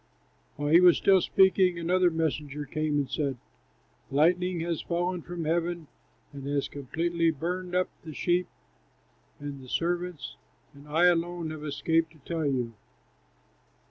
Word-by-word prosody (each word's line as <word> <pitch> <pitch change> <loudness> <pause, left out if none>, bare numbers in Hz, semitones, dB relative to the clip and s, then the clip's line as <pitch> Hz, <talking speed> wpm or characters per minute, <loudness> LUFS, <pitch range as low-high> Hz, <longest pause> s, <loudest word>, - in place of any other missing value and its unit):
While 145 0 -2
he 170 +3 +7
was 180 -2 +7
still 190 -2 +4
speaking, 190 -2 +4
another 180 +2 +3
messenger 150 -3 -2
came 155 +1 -1
and 140 -2 0
said, 135 0 -2 0.7
"Lightning 175 +5 +2
has 170 -1 -2
fallen 175 +1 -1
from 170 0 -6
heaven 170 +1 -1 0.5
and 140 -1 -7
has 140 -1 0
completely 165 +5 -1
burned 180 +4 -3
up 185 0 +2 0.2
the 155 -3 -9
sheep 180 0 +1 0.9
and 145 -1 -7
the 130 - -12
servants, 175 0 -2 0.4
and 140 +1 -15
I 160 +4 +3
alone 175 -1 +1
have 155 -1 -7
escaped 160 +2 0
to 155 - -20
tell 165 -3 -1
you." 125 -4 -1
165 Hz, 140 wpm, -28 LUFS, 145-175 Hz, 0.9 s, he